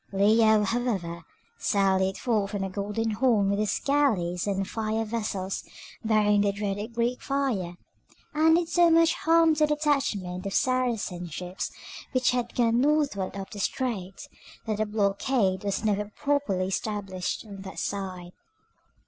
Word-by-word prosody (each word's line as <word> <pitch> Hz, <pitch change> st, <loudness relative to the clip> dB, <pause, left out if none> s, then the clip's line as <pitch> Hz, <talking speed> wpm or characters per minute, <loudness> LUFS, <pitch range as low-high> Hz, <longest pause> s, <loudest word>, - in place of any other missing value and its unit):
Leo, 215 Hz, +2 st, +4 dB
however, 200 Hz, -7 st, -2 dB, 0.4 s
sallied 190 Hz, -1 st, +2 dB
forth 215 Hz, -5 st, 0 dB
from 200 Hz, -2 st, -3 dB
the 195 Hz, -, -2 dB
Golden 210 Hz, +3 st, -2 dB
Horn 215 Hz, -3 st, +2 dB
with 200 Hz, -, 0 dB
his 215 Hz, -1 st, 0 dB
galleys 210 Hz, -12 st, +1 dB
and 195 Hz, -1 st, -1 dB
fire 220 Hz, 0 st, -2 dB
vessels 210 Hz, -4 st, -3 dB, 0.4 s
bearing 210 Hz, -2 st, +3 dB
the 200 Hz, 0 st, +2 dB
dreaded 205 Hz, +2 st, -4 dB
Greek 240 Hz, +1 st, 0 dB
fire, 250 Hz, -11 st, -1 dB, 0.6 s
and 320 Hz, +1 st, +5 dB
did 340 Hz, 0 st, +1 dB
so 345 Hz, 0 st, +4 dB
much 330 Hz, 0 st, +5 dB
harm 330 Hz, -1 st, +4 dB
to 305 Hz, 0 st, +2 dB
the 300 Hz, -, +1 dB
detachment 225 Hz, -12 st, -1 dB
of 195 Hz, -, -3 dB
Saracen 235 Hz, -9 st, 0 dB
ships 180 Hz, +4 st, -5 dB, 0.4 s
which 255 Hz, -1 st, +3 dB
had 245 Hz, -1 st, -2 dB
gone 235 Hz, 0 st, +3 dB
northward 280 Hz, -11 st, +1 dB
up 195 Hz, -1 st, -7 dB
the 205 Hz, -, -7 dB
strait, 195 Hz, -4 st, -3 dB, 0.4 s
that 215 Hz, -2 st, -1 dB
the 215 Hz, 0 st, 0 dB
blockade 200 Hz, -1 st, +1 dB
was 200 Hz, +2 st, -2 dB
never 210 Hz, -1 st, +1 dB
properly 210 Hz, -5 st, -1 dB
established 195 Hz, -1 st, -3 dB
on 200 Hz, -2 st, -9 dB
that 190 Hz, -1 st, -9 dB
side. 185 Hz, -3 st, -4 dB
210 Hz, 150 wpm, -27 LUFS, 195-250 Hz, 0.6 s, and